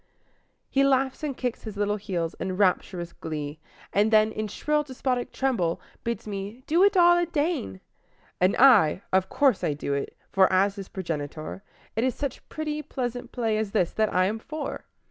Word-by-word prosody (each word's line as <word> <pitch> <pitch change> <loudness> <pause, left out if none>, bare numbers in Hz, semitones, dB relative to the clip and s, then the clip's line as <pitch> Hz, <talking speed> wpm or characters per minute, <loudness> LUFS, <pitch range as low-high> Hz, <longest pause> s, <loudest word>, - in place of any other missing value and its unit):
He 275 - +2
laughs 270 -1 +2
and 290 -4 -3
kicks 245 -3 -2
his 215 -2 -7
little 205 0 0
heels 180 -5 -3
in 185 -1 -3
rapturous 180 -3 +1
glee, 150 -1 -5 0.3
and 205 +2 +3
then 215 0 +4
In 215 0 -3
shrill, 300 +8 0
despotic 260 -3 -2
treble 215 -12 0 0.2
bids 235 0 -3
me 205 +4 -6
"do 340 +5 +3
it 400 0 +4
all 350 0 +6
aden!" 315 - -1 0.6
And 185 +2 +3
I 210 - +6
of 190 0 +3
course 275 -8 +2
I 150 - +1
do 140 -1 -3
it; 140 - -3
for, 190 -1 +4
as 195 +2 +3
his 195 -2 -8
progenitor, 155 -1 -5 0.3
It 225 - +1
is 255 -2 +1
such 280 -3 -5
pretty, 305 -1 -3
pleasant 245 -4 -4
play 225 -3 0
as 215 -2 -3
this 180 -5 +2
that 215 -1 +1
I 185 0 +3
am 215 +4 -1
for! 300 +5 -6
215 Hz, 180 wpm, -26 LUFS, 185-270 Hz, 0.6 s, all